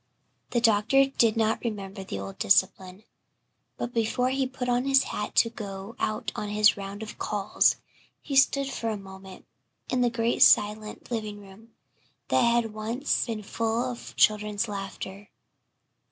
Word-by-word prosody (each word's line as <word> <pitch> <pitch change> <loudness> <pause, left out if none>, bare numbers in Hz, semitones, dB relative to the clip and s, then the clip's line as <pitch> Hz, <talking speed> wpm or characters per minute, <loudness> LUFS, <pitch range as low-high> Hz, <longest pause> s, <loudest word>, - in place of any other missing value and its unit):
The 240 - +1
doctor 230 +4 +4
did 230 -5 +1
not 220 0 +1
remember 200 -4 -5
the 145 - -6
old 95 0 -7
discipline. 185 - +1 0.7
But 240 - -4
before 250 +3 0
he 265 0 0
put 255 -1 -5
on 245 +1 +1
his 270 -1 +4
hat 210 - -5
to 230 - +4
go 200 -1 -8
out 215 0 -2
on 210 - -4
his 210 +1 +4
round 200 +1 -7
of 215 - -9
calls 205 -1 +2 0.4
he 280 - -5
stood 270 +1 +4
for 235 -4 -3
a 215 - -2
moment 190 -1 -12 0.5
in 255 - +1
the 245 - +3
great 230 0 -1
silent 215 +3 +3
living 215 -3 -4
room 205 +3 -16 0.5
that - - +3
had 235 -2 +2
once 230 +8 -1
been 220 -2 -4
full 230 +4 -1
of 240 - -10
children's 210 0 +2
laughter. 195 0 -7
220 Hz, 155 wpm, -27 LUFS, 205-240 Hz, 0.7 s, doctor